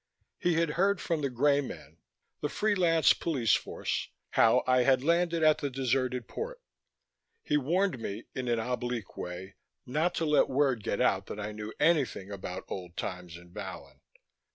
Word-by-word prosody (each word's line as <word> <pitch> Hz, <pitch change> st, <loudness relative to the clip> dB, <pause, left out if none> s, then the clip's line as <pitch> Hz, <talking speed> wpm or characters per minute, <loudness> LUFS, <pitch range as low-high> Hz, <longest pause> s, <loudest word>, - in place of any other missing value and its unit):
He 175 Hz, -1 st, +2 dB
had 165 Hz, -1 st, +2 dB
heard 195 Hz, +4 st, +2 dB
from 165 Hz, -3 st, -1 dB
the 140 Hz, -, 0 dB
Greymen, 130 Hz, -, 0 dB, 0.4 s
the 150 Hz, -, -2 dB
free 215 Hz, +6 st, +1 dB
lance 165 Hz, -4 st, +4 dB
police 130 Hz, -11 st, +1 dB
force, -, -, -1 dB, 0.2 s
how 115 Hz, +3 st, +4 dB
I 130 Hz, 0 st, +4 dB
had 130 Hz, 0 st, +3 dB
landed 170 Hz, +1 st, +2 dB
at 155 Hz, -1 st, +5 dB
the 145 Hz, -, -2 dB
deserted 130 Hz, -1 st, -1 dB
port. -, -, -5 dB, 0.8 s
He -, -, 0 dB
warned 165 Hz, +2 st, +1 dB
me, 110 Hz, 0 st, -5 dB
in 130 Hz, -1 st, -4 dB
an 120 Hz, -1 st, +2 dB
oblique 120 Hz, -1 st, -3 dB
way, 90 Hz, +2 st, -7 dB, 0.3 s
not 155 Hz, +7 st, 0 dB
to 165 Hz, -, 0 dB
let 150 Hz, -1 st, +4 dB
word 130 Hz, -5 st, +1 dB
get 100 Hz, -, -1 dB
out 95 Hz, 0 st, +2 dB
that 105 Hz, -, -6 dB
I 105 Hz, +1 st, -4 dB
knew 105 Hz, 0 st, -6 dB
anything 145 Hz, -, +2 dB
about 95 Hz, -2 st, -5 dB
old 90 Hz, -2 st, -7 dB
times 90 Hz, -3 st, -5 dB
in 85 Hz, 0 st, -16 dB
Vallon. -, -, -8 dB
130 Hz, 170 wpm, -30 LUFS, 105-160 Hz, 0.8 s, at